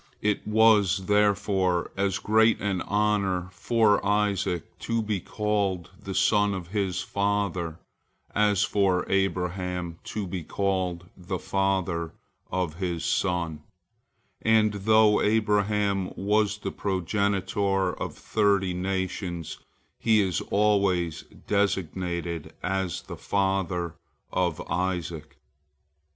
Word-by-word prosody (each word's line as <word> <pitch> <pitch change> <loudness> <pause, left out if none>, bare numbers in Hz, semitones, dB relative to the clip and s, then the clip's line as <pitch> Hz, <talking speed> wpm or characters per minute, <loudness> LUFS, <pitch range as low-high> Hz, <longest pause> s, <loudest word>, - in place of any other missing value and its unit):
" - - -35
It 105 0 0
was, 105 -4 +4
therefore, 100 -3 +2
as 100 0 0
great 110 +2 +3
an 95 -3 -1
honor 100 -3 0
for 105 +3 +2
Isaac 100 -4 +1 0.2
to 115 -1 -1
be 105 -2 -1
called 100 -3 -1
the 95 -2 -6
son 105 -2 +3
of 90 -2 -7
his 95 -2 -1
father 100 -5 -1 0.6
as 105 -1 +3
for 95 -3 +2
Abraham 90 -2 -1
to 105 -2 -4
be 90 -2 -4
called 90 -1 -1
the 90 0 -4
father 95 -4 -1 0.4
of 90 -4 -2
his 90 -3 -2
son, 85 -4 0 0.8
and 110 -1 +3
though 105 +1 +4
Abraham 105 -2 +1
was 105 +1 +1
the 100 -2 -4
progenitor 95 0 0
of - - -5
thirty 100 -3 +1
nations, 90 -2 -3 0.4
he 110 -2 +4
is 95 -4 +1
always 100 -5 +1 0.2
designated 90 -4 -1
as 95 -2 -2
the - - -8
father 95 -4 -1 0.4
of 90 -4 0
Isaac. 85 -4 -3
95 Hz, 110 wpm, -26 LUFS, 90-105 Hz, 0.8 s, was